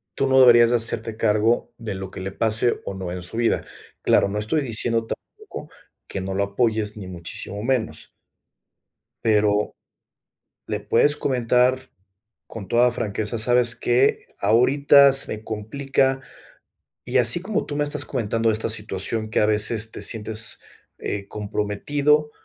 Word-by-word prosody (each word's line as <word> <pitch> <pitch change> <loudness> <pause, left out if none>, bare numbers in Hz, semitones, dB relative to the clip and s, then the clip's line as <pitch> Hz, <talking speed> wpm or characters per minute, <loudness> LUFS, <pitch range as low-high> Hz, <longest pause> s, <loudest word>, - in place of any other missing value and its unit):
tú - - 0
no 135 0 +4
deberías 120 -2 +7
de 120 - +4
hacerte 115 -1 -4
cargo 110 +2 +1
de 115 -3 -5
lo 95 0 -6
que - - -9
le 95 +1 -5
pase 110 +3 0
o 95 - -5
no 95 -2 -5
en 90 0 -5
su 90 +6 -7
vida. 115 0 +1 0.4
Claro, - - +3
no 100 +2 -3
estoy 110 +9 0
diciendo 115 -2 -1
tampoco 425 - -9 0.4
que - - -4
no 95 +1 -4
lo 100 +1 0
apoyes, 110 0 -1
ni 100 - -7
muchísimo 90 +3 -7
menos 120 -1 -2 1.2
pero 105 -2 +2 0.9
le - - -2
puedes 145 0 +2
comentar 130 0 +1 0.6
con 105 -4 -8
toda 120 +1 +4
franqueza: 110 0 -3
"¿Sabes 120 +1 +2
qué? 120 +3 +1
Ahorita 140 +4 +5
se 135 - -3
me 110 0 -8
complica", 135 +5 -1 0.8
y 125 +2 +1
así 120 +7 +3
como 205 +4 -2
tú 145 - -5
me 145 - +1
estás 145 0 0
comentando 115 -2 -1
de - - +1
esta 110 +1 -1
situación 110 0 -3
que - - +1
a 105 - +4
veces 110 +1 0
te - - -8
sientes, 110 -1 -1 0.4
eh, 100 -1 -4
comprometido, 140 +9 0
115 Hz, 155 wpm, -23 LUFS, 105-130 Hz, 1.2 s, deberías